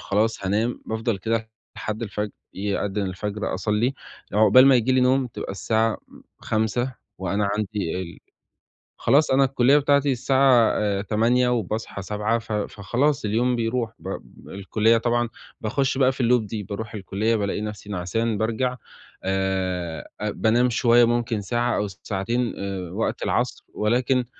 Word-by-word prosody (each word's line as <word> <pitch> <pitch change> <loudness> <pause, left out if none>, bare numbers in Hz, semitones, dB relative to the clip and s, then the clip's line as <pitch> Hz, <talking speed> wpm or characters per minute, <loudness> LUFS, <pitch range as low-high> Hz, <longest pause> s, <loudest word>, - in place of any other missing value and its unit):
خلاص 105 0 0
هانام، 110 +5 0
بافضل 110 -1 -1
كده 110 +2 -2 0.3
لحد 110 +2 -4
الفجر، 105 -1 -3 0.2
يأدِّن 100 +1 -2
الفجر 100 +3 -3
أصلّي. 105 +7 0 0.4
عقبال 110 +6 +6
ما 135 - +7
ييجي 125 +2 +3
لي 130 - +4
نوم 130 +1 +3
تبقى 115 - -6
الساعة 110 +3 +1
م - - -16 0.2
05:00 110 +4 -1 0.2
وأنا 100 +2 0
عندي 105 -5 -2
ال 85 -2 -9 0.8
خلاص 145 +1 +3
أنا 135 +1 +5
الكُلّية 135 +2 +4
بتاعتي 140 0 +3
الساعة 130 -2 +4
آآ 100 -2 0
08:00 115 +5 +2
وباصحى 110 -3 -2
07:00، 105 +4 -1
ف 115 -1 -11
فخلاص 120 +7 0
اليوم 120 +4 +1
بيروح 115 0 -1
ب 95 - -7 0.4
الكُلّية 110 +4 +2
طبعًا 120 0 0 0.3
باخُش 135 +5 0
بقى 130 -1 +4
في 130 -1 -3
الloop 120 0 +4
دي، 105 0 -4
باروح 110 +2 -6
الكُلّية 105 +3 -1
بالاقي 100 -1 -1
نَفْسي 105 -1 -6
نعسان 105 +4 -1
بارجع 125 +4 -1 0.5
آآ، 95 -3 -2
أ 105 - 0
بانام 120 +3 +2
شوية 120 0 +5
ممكن 120 -2 0
ساعة 120 +4 0
أو 105 - 0
ساعتين 105 +5 -2
آآ 95 -3 -4
وقت 110 +4 -2
العصر - - -1
ولكن 125 +3 +1
110 Hz, 150 wpm, -24 LUFS, 100-125 Hz, 0.8 s, ما